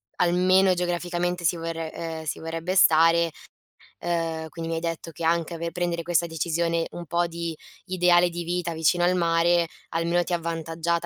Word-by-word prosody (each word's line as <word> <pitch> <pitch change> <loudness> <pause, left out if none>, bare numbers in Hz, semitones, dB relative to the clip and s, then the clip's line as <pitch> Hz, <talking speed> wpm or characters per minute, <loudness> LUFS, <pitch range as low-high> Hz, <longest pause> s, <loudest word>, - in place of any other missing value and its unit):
almeno 185 +2 +4
geograficamente 175 0 -2
si 170 +1 +2
vorre 165 -1 -4
ehm, 160 -1 -5
si 155 - -4
vorrebbe 165 +3 -3
stare 165 -1 +5 0.7
ehm, 165 -2 -2
quindi 165 0 -6
mi 165 - -1
hai - - -3
detto 165 0 -4
che 165 - -8
anche 170 +1 +1
ave 170 0 -4
prendere 175 -1 -2
questa 170 0 +1
decisione 165 +1 -1
un 175 0 -7
po' 175 +2 0
di 170 -1 -5 0.3
ideale 180 -1 +4
di 175 0 -5
vita, 175 0 -2
vicino 165 +2 +2
al 180 - +3
mare, 170 0 +3 0.2
almeno 170 +1 +1
ti 175 - -4
ha - - +3
avvantaggiata 165 0 -2
170 Hz, 175 wpm, -25 LUFS, 165-175 Hz, 0.7 s, stare